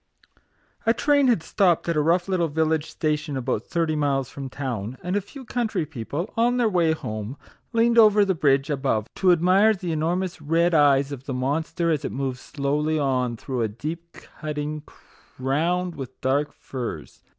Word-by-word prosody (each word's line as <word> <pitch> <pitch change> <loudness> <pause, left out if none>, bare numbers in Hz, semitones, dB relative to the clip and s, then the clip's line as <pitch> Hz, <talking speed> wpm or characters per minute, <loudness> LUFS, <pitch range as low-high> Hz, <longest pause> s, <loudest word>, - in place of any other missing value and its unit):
A 230 - +4
train 285 +1 +3
had 230 -10 +2
stopped 180 -6 +2
at 170 - +1
a 150 - +3
rough 175 +4 +2
little 180 -3 +1
village 160 0 0
station 150 -2 -2
about 120 -3 -2
thirty 165 -2 0
miles 135 -3 0
from 135 -1 -6
town, 125 -4 -4
and 180 +2 -2
a 205 - +2
few 260 +7 -12
country 220 -9 -1
people, 150 - -5
on 240 +2 +2
their 240 -2 +3
way 175 -6 +2
home, 110 -3 -5 0.3
leaned 235 0 +4
over 210 -2 +6
the 190 - +1
bridge 140 -3 +2
above 135 -7 0
to 185 -1 +4
admire 185 +6 +4
the 180 -3 -4
enormous 170 +2 -1
red 165 +4 +2
eyes 140 -2 +4
of 135 -2 -7
the 135 - -3
monster 160 +6 -1
as 150 -4 0
it - - -3
moved 130 -2 -3
slowly 150 +3 -1
on 130 -4 0
through 125 +1 -3
a 115 - +2
deep 160 +10 -6
cutting 150 0 -5 0.6
crowned 170 +7 0
with 130 -3 -8
dark 140 +3 0
firs. 125 -3 -7
155 Hz, 175 wpm, -24 LUFS, 135-180 Hz, 0.6 s, over